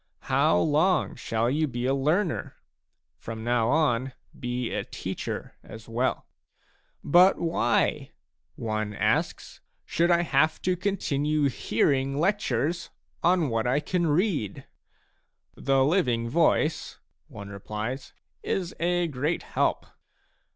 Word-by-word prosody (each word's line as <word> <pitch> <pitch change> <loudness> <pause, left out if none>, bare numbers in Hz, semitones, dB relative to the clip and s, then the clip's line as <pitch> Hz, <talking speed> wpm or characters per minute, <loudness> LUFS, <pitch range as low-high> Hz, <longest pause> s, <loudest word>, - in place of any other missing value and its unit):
How 85 - +4
long 155 - +2
shall 115 +1 -1
you 150 +5 +1
be 120 -2 -4
a 135 - +2
learner? 155 +6 0 0.6
From 110 -1 -7
now 120 -1 +1
on 130 -3 +1 0.3
be 125 -1 -3
a - - -1
teacher - - -5
as 110 0 -12
well! 120 +3 -1 0.4
" - - -37 0.3
But 180 +5 +5
why," 165 -8 0 0.5
one 110 -2 -3
asks/* - - -1
" - - -47
should 170 +2 +1
I 175 0 +4
have 155 0 +2
to 185 0 +1
continue 150 -6 0
hearing 135 +1 0
lectures 170 - 0 0.3
on 175 -4 +3
what 115 0 0
I 130 +4 +2
can 175 +2 -1
read? 150 - 0 0.3
" - - -41
" - - -53 0.2
The 135 -1 +2
living 125 -9 +1
voice," 160 +2 +1 0.3
one 100 0 -9
replies, 110 +6 -5 0.2
" - - -49
is 180 -3 -2
a 175 +1 +1
great 150 +3 -2
help." - - 0
140 Hz, 130 wpm, -26 LUFS, 120-170 Hz, 0.6 s, But